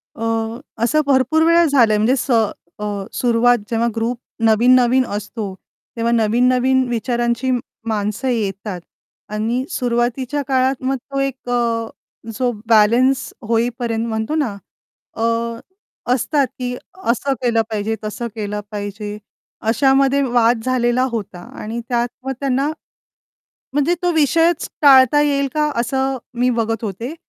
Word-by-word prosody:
अ, 225 - -6 0.6
असं 305 +6 +3
भरपूर 275 +4 +3
वेळा 335 +1 +5
झालं 240 -7 +4
म्हणजे 230 +5 +3
स 265 - -3 0.5
अ, - - -5 0.3
सुरवात 245 0 +3
जेव्हा 230 0 +1
ग्रुप 230 +2 -1 0.3
नवीन-नवीन 245 +3 +4
असतो. 205 -1 -5 0.4
तेव्हा 230 0 0
नवीन-नवीन 250 +3 +3
विचारांची 240 +1 -1 0.4
माणसं 215 +4 -2
येतात 205 -5 -2 0.5
आणि 225 +4 -1
सुरुवातीच्या 245 +3 -1
काळात 260 0 +1
मग 265 +1 +1 0.2
तो 275 - -1
एक 270 -2 -3
अ, 230 -2 0 0.5
जो 250 -2 +1 0.2
बॅलन्स 235 +4 +3 0.2
होईपर्यंत 235 0 0
म्हणतो 220 +6 -2
ना 265 -10 -1 0.6
अ, 225 - -1 0.9
असतात, 275 +2 +1
की 250 0 -3 0.4
असं 270 +4 -1
केलं 235 -2 +2
पाहिजे, 220 0 -2
तसं 215 +3 -4
केलं 210 -1 -3
पाहिजे 205 0 -5 0.5
अशामध्ये 270 +2 +3
वाद 240 -2 +2
झालेला 255 -1 +2
होता 205 -6 -5 0.2
आणि 225 +2 -4
त्यात 240 -1 +1 0.2
मग 270 - -1
त्यांना 275 0 0 1.1
म्हणजे 290 +5 +2
तो 355 - +2
विषयच 325 +2 +2
टाळता 275 0 +7
येईल 280 -1 +1
का? 300 0 +1
असं 265 +2 -1 0.2
मी 250 +1 +3
बघत 225 -1 -1
होते. 225 - -5
245 Hz, 125 wpm, -19 LUFS, 225-265 Hz, 1.1 s, टाळता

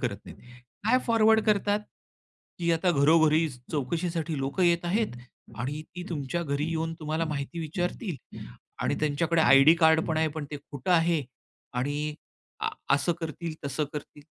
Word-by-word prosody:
करत - - -1
नाहीत. - - -12 0.5
काय 250 +4 +4
फॉरवर्ड 225 -1 +5
करतात, 205 0 +2 0.8
की 170 -1 0
आता 165 +2 +2
घरोघरी 155 +1 +4 0.2
चौकशीसाठी 160 +2 -2
लोकं 135 +7 -1
येत 170 0 +3
आहेत 205 - 0 0.4
आणि 140 +6 -3
ती 180 - -4
तुमच्या 165 +1 -2
घरी 145 0 -1
येऊन 165 0 -2
तुम्हाला 155 +1 -1
माहिती 140 +3 -4
विचारतील 175 - -3 0.7
आणि - - +1
त्यांच्याकडे 160 +3 +1
आयडी 140 +4 +7
कार्ड 160 -1 +5
पण 160 - -1
आहे, 160 0 +2
पण 155 - -4
ते 145 - -4
खोटं 145 +2 -6
आहे 165 -3 +3 0.5
आणि 145 +3 -2 0.5
आ, - - 0 0.3
असं 145 +5 +1
करतील 165 0 -5
तसं 140 +2 -1
करतील. 145 0 -8
160 Hz, 150 wpm, -27 LUFS, 145-175 Hz, 0.8 s, आयडी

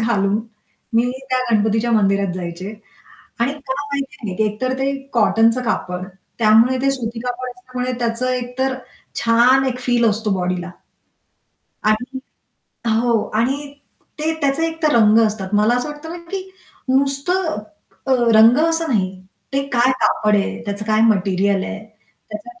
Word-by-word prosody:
घालून 205 -3 +1 0.6
मी 235 +2 +3 0.2
त्या 255 - +2
गणपतीच्या 220 +2 +2
मंदिरात 200 -3 +2
जायचे. 185 +3 -6 0.7
आणि 260 +4 +1
का 265 - 0
माहिती 280 0 -4 0.2
नाही - - -5
एकतर 255 +5 -2
ते 275 +1 +1 0.2
कॉटनचं 225 +1 +3
कापड, 180 -5 -2 0.3
त्यामुळे 225 +3 +5
ते 275 - +2
सुती 235 -3 -4
कापड 250 +1 -4
असल्यामुळे 250 0 -5
त्याचं 235 +1 -1
एकतर 255 +1 -2 0.5
छान 245 +3 +4
एक 250 -1 -2
फील 245 -1 +1
असतो 215 +1 -2
बॉडीला. 180 0 -2 1.1
आणि 245 +5 0 0.8
हो 235 -3 +2
आणि 245 +5 +2 0.6
ते 310 +1 0
त्याचे 285 +3 +1
एकतर 325 -2 0
रंग 220 -1 +5
असतात. 205 -3 -4
मला 215 +3 +4
असं 245 - -2
वाटतं 295 +2 -9
ना - - -6
की 385 -1 -4 0.4
नुसतं 280 +6 +1 0.5
अ, 265 - +2 0.2
रंग 225 +3 +7
असं 330 0 0
नाही. 200 -7 +1 0.4
ते 275 0 +1
काय 245 +1 +4
कापड 210 -1 +2
आहे? 200 - -2
त्याचं 205 0 -4
काय 215 0 +2
मटेरिअल 195 -1 +2
आहे? 215 - -5 0.5
त्याच्या 360 +13 -9
235 Hz, 140 wpm, -19 LUFS, 210-265 Hz, 1.1 s, रंग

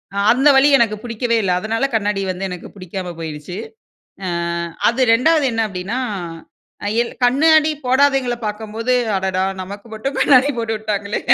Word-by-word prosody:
அ, - - -3
அந்த 270 +4 +4
வலி 275 +2 +5
எனக்கு 225 -3 +2
புடிக்கவே 235 0 -1
இல்ல. 180 -2 +1
அதனால 225 +5 -1
கண்ணாடி 205 -2 0
வந்து 190 +2 -4
எனக்கு 180 -1 -7
பிடிக்காம 185 -1 -6
போயிடுச்சு. 160 +2 -6 0.7
அ, - - -2 0.6
அது 240 - -4
2வது 305 +5 +3
என்ன 225 0 0
அப்டின்னா, 195 +5 -4 0.9
அ, - - -2 0.2
எல் 235 - -6
கண்ணாடி 310 +5 +4 0.2
போடாதவங்களை 260 -2 +2
பாக்கும்போது, 220 +3 -2 0.2
"அடடா! 190 0 0 0.2
நமக்கு 200 +3 -9
மட்டும் 270 +6 -4
கண்ணாடி 270 0 +5
போட்டு 230 -1 -1
விட்டாங்களே," 210 -1 -3
225 Hz, 150 wpm, -19 LUFS, 195-255 Hz, 0.9 s, வலி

